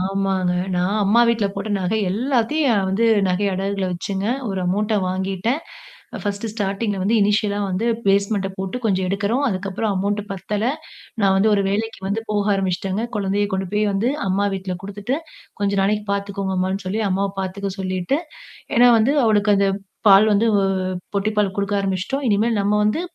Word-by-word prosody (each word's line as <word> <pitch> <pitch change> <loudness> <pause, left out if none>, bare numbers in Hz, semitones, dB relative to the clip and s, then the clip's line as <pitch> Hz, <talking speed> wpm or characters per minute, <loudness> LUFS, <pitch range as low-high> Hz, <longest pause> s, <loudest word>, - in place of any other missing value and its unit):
ஆமாங்க. 190 -1 0 0.2
நான் 180 +4 0
அம்மா 215 +4 +4
வீட்ல 225 -3 +2
போட்ட - - -4
நகை 185 +4 0
எல்லாத்தையும் 245 +1 +1
வந்து 205 +5 +1 0.2
நகை 185 +3 +1
அடகுகள்ல 195 +1 -1
வச்சுங்க. 190 +3 -3 0.2
ஒரு 195 -1 -2
அமௌன்ட்ட 210 +4 0
வாங்கிட்டேன். 190 - -1 0.6
ஃபர்ஸ்ட் 205 +2 -3
ஸ்டார்டிங்ல 205 -1 -2
வந்து 205 +5 +1
இனிஷியலா 205 0 +2
வந்து 190 +5 -1 0.2
பேஸ்மெண்ட 200 0 +2
போட்டு 190 +3 -3
கொஞ்சம் 190 -3 +1
எடுக்குறோம். 200 +7 0
அதுக்கப்புறம் 200 +1 -2
அமௌண்ட் 200 +2 0
பத்தல, 200 +2 -3 0.6
நான் 195 -2 +4
வந்து 205 +3 +3
ஒரு 200 - +2
வேலைக்கு 220 +2 -2
வந்து 200 +3 -1
போக 205 -1 +1
ஆரம்பிச்சுட்டேங்க. 195 +2 -1
குழந்தைய 205 0 0
கொண்டு 190 0 -1
போய் 210 0 +2
வந்து 200 +5 +1 0.2
அம்மா 195 +2 +1
வீட்ல 190 -1 -4
குடுத்துட்டு, 205 +6 -3 0.4
"கொஞ்சம் 200 -1 +1
நாளைக்கு 210 +2 0
பார்த்துக்கோங்க 200 -1 -2
அம்மான்னு" 190 +1 -1
சொல்லி, 205 +4 -1
அம்மாவ 195 +1 0
பார்த்துக்க 195 +1 -3
சொல்லிட்டு, 185 +7 -1 0.6
ஏன்னா 245 +1 +7
வந்து 230 +6 +3
அவளுக்கு 210 -1 +3
அந்த 200 0 +3 0.4
பால் 200 +3 +7
வந்து 215 +3 +3 0.7
பொட்டி 200 +2 +1
பால் 200 -2 +1
குடுக்க 200 0 0
ஆரம்பிச்சுட்டோம். 195 +9 -2
இனிமேல் 215 +1 +2
நம்ம 200 +1 +1
வந்து 215 +10 +1
200 Hz, 160 wpm, -21 LUFS, 190-215 Hz, 0.7 s, ஏன்னா